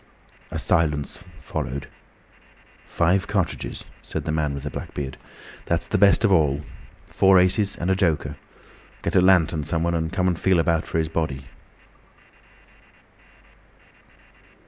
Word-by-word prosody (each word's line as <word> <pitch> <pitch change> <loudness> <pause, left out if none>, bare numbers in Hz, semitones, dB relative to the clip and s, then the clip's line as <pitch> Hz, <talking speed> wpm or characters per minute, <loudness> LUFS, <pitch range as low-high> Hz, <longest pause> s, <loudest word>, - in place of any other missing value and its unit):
A - - -5
silence 75 -2 0 0.2
followed. 70 -2 -4 1.0
"Five 95 +4 +1
cartridges," 95 -4 -2 0.2
said - - -5
the - - -1
man 75 -2 -1
with 70 - -7
the 75 - -4
black - - -7
beard. 65 -2 -4 0.5
"That's 85 -1 0
the - - -1
best 100 +2 +5
of 105 - +3
all. 75 -5 +3 0.4
Four 95 -1 +4
aces 95 +2 +3
and 90 +2 -2
a - - +3
joker. 80 -6 0 0.7
Get - - -2
a 90 - +6
lantern, 85 -4 +3
someone, 85 +2 -1
and 80 -1 -1
come 95 -1 0
and 90 -2 0
feel 95 -2 +3
about 80 -1 +1
for - - -2
his 80 -1 +1
body." 75 -5 -3
85 Hz, 140 wpm, -23 LUFS, 75-95 Hz, 1.0 s, a